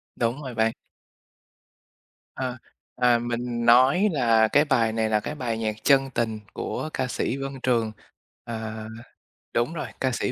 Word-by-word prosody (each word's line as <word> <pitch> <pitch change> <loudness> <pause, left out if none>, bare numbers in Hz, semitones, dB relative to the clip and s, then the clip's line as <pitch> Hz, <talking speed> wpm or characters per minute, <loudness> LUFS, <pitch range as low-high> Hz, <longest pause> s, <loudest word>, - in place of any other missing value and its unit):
Đúng 120 +4 -1
rồi 130 -2 -6
bạn. 110 0 +2 1.6
Ờ, 130 -1 -3 0.4
à, 125 -1 +4
mình 120 0 -3
nói 130 - +6
là 115 -7 +4
cái 145 +7 +4
bài 120 -6 +2
này 110 -1 0
là 110 -1 +3
cái 130 +8 -5
bài 120 -6 -2
nhạc 110 -1 -1
"Chân 135 -1 +4
Tình" 110 -2 -1
của 155 - -4
ca 130 - -1
sĩ 125 +1 -2
Vân 135 0 -4
Trường. 115 -3 +1 0.5
Ờ, 110 -1 -5 0.7
đúng 120 +7 +1
rồi, 160 - -4
ca 130 - +2
sĩ 125 - -1
120 Hz, 155 wpm, -25 LUFS, 115-130 Hz, 1.6 s, nói